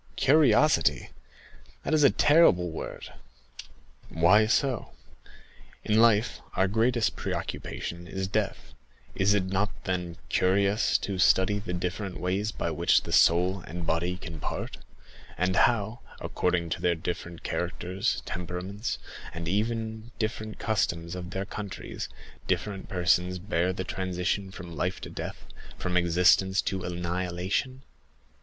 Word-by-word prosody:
"Curiosity—that 135 - +1
is 155 -1 +4
a 140 - +8
terrible 120 - +4
word." 80 - -7 1.0
"Why 95 +7 +5
so? 125 +1 0 0.9
In 110 +1 +3
life, 115 -1 +3
our 95 - +3
greatest 115 +3 +1
preoccupation 85 +1 -4
is 95 0 -3
death; 100 - -2 0.4
is 100 +2 +3
it 95 -3 +1
not 95 +2 -2
then, 90 -2 -3
curious 100 +3 +2
to 95 -2 -4
study 95 +2 +4
the 95 -3 -5
different 90 +2 -3
ways 95 +4 -1
by - - -3
which - - +3
the - - -7
soul 90 +3 +4
and 85 0 -5
body 85 +3 0
can 85 -3 -8
part; - - -4 0.6
and 90 +2 +1
how, 110 +2 +2 0.2
according 85 -2 -1
to - - -2
their 90 -1 +2
different 85 +1 -5
characters, 90 +2 -2
temperaments, 90 +5 -4 0.4
and 85 0 -5
even 110 +3 -1
the 120 - -15
different 110 -1 -3
customs 85 -6 -1
of 90 -1 -6
their 95 +1 -3
countries, 100 -1 -6 0.4
different 100 -2 -2
persons 90 0 +2
bear 90 -1 0
the 95 0 -3
transition 95 +1 -2
from 90 -4 -9
life - - -1
to - - -7
death, - - -6 0.3
from 90 0 -3
existence 90 +2 +4
to 95 -1 -2
annihilation? 90 +8 -2
95 Hz, 130 wpm, -28 LUFS, 90-105 Hz, 1.0 s, a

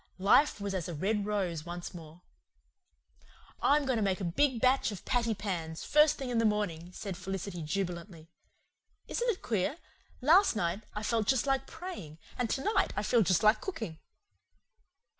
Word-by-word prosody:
Life 205 +8 +4
was 200 -1 -3
as 185 -4 -2
a 170 - -4
red 205 +5 0
rose 185 -7 -1
once 175 +2 -6
more. 165 0 -12 1.4
"I'm 290 0 +3
going 260 -3 +1
to - - 0
make 195 -2 +1
a - - -4
big 245 +9 +1
batch 255 -1 +3
of 200 - -8
patty 235 -3 +1
pans, 170 -6 -4
first 300 0 +4
thing 260 -2 -4
in 235 - +1
the - - +2
morning," 190 -6 -1
said 195 0 -6
Felicity 190 -1 -5
jubilantly. 170 0 -4 0.8
"Isn't 485 0 -1
it 415 - -2
queer? 220 - 0 0.4
Last 330 - +5
night 195 0 -1
I 210 - -3
felt 220 -1 0
just 265 -2 +3
like 270 -1 0
praying, 320 - -8 0.2
and 245 -2 -1
tonight 355 - +1
I 205 - 0
feel 235 +2 +3
just 185 -3 +2
like 215 +1 +5
cooking." 220 - -5
205 Hz, 170 wpm, -31 LUFS, 175-255 Hz, 1.4 s, Last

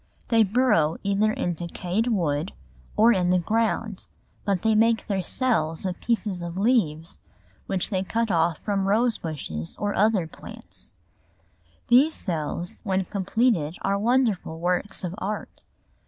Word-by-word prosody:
They 230 -1 +4
burrow 200 -8 +3
either 200 +2 +2
in 175 -4 -1
decayed 175 +6 -2
wood 170 -7 0 0.4
or 230 +2 +6
in 180 -3 +1
the 180 - +4
ground, 220 +2 -1 0.4
but 195 -3 0
they 220 -1 +3
make 225 +1 +3
their 195 -2 -1
cells 180 -8 0
of 180 -1 -3
pieces 210 -6 -1
of 170 +1 -5
leaves 185 -8 +1 0.5
which 190 +1 -1
they 190 -2 0
cut 225 +3 -1
off 165 -2 +2
from 195 -2 0
rose 225 +3 +2
bushes 85 - -5
or 205 0 -1
other 205 -3 +2
plants; 160 - -10 0.9
these 275 +6 +5
cells 170 0 -3
when 190 -3 0
completed 195 -4 0
are 200 +1 +1
wonderful 220 -8 +1
works 180 +4 -1
of 180 -1 -3
art. 210 +2 -5
195 Hz, 140 wpm, -25 LUFS, 175-225 Hz, 0.9 s, or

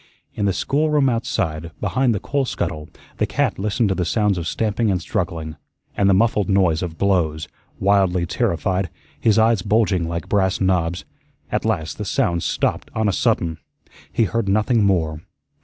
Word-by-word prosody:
In 100 - -2
the 100 - +3
schoolroom 145 - +1
outside, 85 -9 -2
behind 130 -3 +1
the - - -2
coal 140 +6 -1
scuttle, 75 -10 -4 0.3
the - - +1
cat - - 0
listened 105 +2 +1
to - - +2
the 90 - -1
sounds 105 0 +1
of 85 - -4
stamping 110 +3 0
and 95 -2 +1
struggling 85 -6 -3 0.4
and 100 -1 +3
the 95 - +5
muffled 105 0 +2
noise 90 -5 +3
of 85 -3 -5
blows, 80 -6 +1 0.3
wildly 95 -3 +2
terrified, 95 - -1 0.3
his 110 -2 +3
eyes 110 -2 +4
bulging 100 -4 +1
like 85 0 -4
brass 95 -1 +1
knobs. 90 -2 0 0.5
At - - -1
last 80 -2 -2
the - - -3
sounds 85 -1 0
stopped - - -1
on 110 -1 +1
a 100 - +1
sudden; 90 -8 0 0.5
he - - +2
heard 110 -1 -1
nothing 110 +3 +2
more. 80 -6 +1
95 Hz, 170 wpm, -21 LUFS, 85-110 Hz, 0.5 s, the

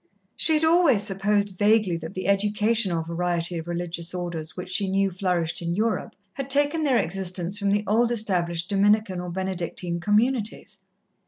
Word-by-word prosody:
She 320 - +3
had 305 - +1
always 320 - +4
supposed 200 -1 -1
vaguely 210 -3 +3
that 160 0 -8
the 185 - -4
educational 205 -2 +1
variety 170 0 -2
of 160 - -8
religious 175 0 -4
Orders 170 -3 -5
which 180 0 -6
she 195 0 +1
knew 195 0 +1
flourished 175 -3 -1
in 170 0 -2
Europe 220 +3 -1 0.2
had 275 +3 -6
taken 290 +3 +4
their 275 -5 +2
existence 185 +1 -2
from 200 -1 0
the 205 +1 +1
old 230 +4 +2
established 175 -6 0
Dominican 205 -1 +2
or 180 - -6
Benedictine 180 -1 -3
communities. 215 +4 0
195 Hz, 160 wpm, -24 LUFS, 175-215 Hz, 0.2 s, always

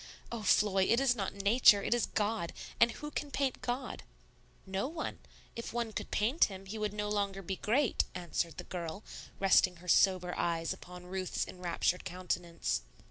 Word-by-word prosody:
Oh, 235 -1 -4
Floy, 195 -2 +4
it 230 - +3
is 265 -2 +3
not 200 -4 -3
Nature; 200 0 +6
it - - +2
is 240 - +1
God. 210 -4 -1 0.3
And 235 - +7
who 295 0 -7
can 295 - -3
paint 275 -2 -1
God?" 250 +1 -3 0.6
"No 190 +5 -2
one. 315 +1 -5 0.4
If 230 - -6
one 235 -2 -2
could - - -4
paint 235 +10 +3
Him, 195 -1 -8
He 215 +3 -6
would 210 -1 -1
no 210 0 -3
longer 200 -2 -1
be 190 +1 -3
great," 245 +4 +2
answered 170 -1 -2
the - - -5
girl, 175 +2 -5 0.4
resting 190 -1 +5
her 175 +1 -15
sober 180 0 +4
eyes 165 -1 0
upon 180 0 -11
Ruth's 185 0 -2
enraptured 180 0 -1
countenance. 175 - -2
195 Hz, 175 wpm, -32 LUFS, 180-230 Hz, 0.6 s, And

